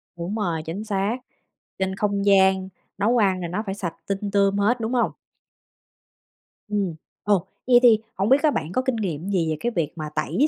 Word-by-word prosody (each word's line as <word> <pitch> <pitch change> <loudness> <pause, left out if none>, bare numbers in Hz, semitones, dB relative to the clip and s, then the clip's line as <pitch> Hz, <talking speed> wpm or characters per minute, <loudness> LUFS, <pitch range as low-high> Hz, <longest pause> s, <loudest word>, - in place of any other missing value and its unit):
Đúng 175 +5 -4
rồi, 175 -7 -1
chính 185 +6 -4
xác. 205 +2 -1 0.6
Trên 190 0 -1
không 200 -1 -1
gian 190 -1 +4 0.3
nấu 225 +5 +2
ăn 190 -4 +2
là 170 - -3
nó 195 +6 -3
phải 195 0 -3
sạch 180 -5 -4
tinh 200 0 -2
tươm 200 0 +3
hết, 225 +5 +2
đúng 225 +3 -2
hông? 245 - +2 1.6
Ừm. 200 -6 -1 0.3
Ồ, 200 -4 +2 0.2
vậy 245 -1 +7
thì 225 -3 +7 0.2
hổng 195 +4 0
biết 270 +2 +5
á, 305 - +5
bạn 160 - -3
có 255 - +1
kinh 260 -2 -1
nghiệm 185 -4 -3
gì 170 -5 +1
về 155 - -1
cái 240 - -1
việc 155 -3 0
mà 155 -2 -5
tẩy 295 +4 +1
200 Hz, 200 wpm, -24 LUFS, 185-220 Hz, 1.6 s, vậy